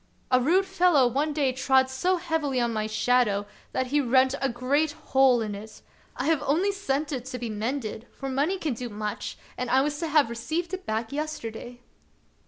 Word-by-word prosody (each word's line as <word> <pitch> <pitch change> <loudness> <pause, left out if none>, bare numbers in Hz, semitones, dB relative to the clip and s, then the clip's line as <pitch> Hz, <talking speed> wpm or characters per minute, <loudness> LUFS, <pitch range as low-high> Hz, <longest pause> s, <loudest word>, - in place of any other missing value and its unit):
" - - -36
A 255 0 +5
rude 360 +9 +3
fellow 360 -7 +4
one 280 +6 +1
day 285 -3 +1
trod 260 +1 +3
so 360 +8 0
heavily 320 -6 -1
on 235 -1 0
my 215 -1 -1
shadow 215 -2 +2 0.3
that 260 - 0
he 295 - +4
rent 260 +1 +3
a 270 - +1
great 280 +5 0 0.2
hole 265 -3 +5
in 210 -1 -4
it. 215 +2 -10 0.3
I - - -3
have 315 -2 +2
only 320 +8 +2
sent 305 -7 -2
it 255 -3 -3
to 255 - -5
be 235 -2 -4
mended, 225 +1 -3
for 270 - -7
money 285 +8 0
can 310 -7 -2
do 240 +1 -5
much, 210 -1 -5 0.2
and 250 -1 -2
I 260 +2 +4
was 295 +1 -1
to 330 - -2
have 295 -6 +3
received 325 +9 -3
it 375 0 -5
back 220 +2 -2
yesterday." 245 -5 -5
265 Hz, 200 wpm, -26 LUFS, 240-305 Hz, 0.3 s, A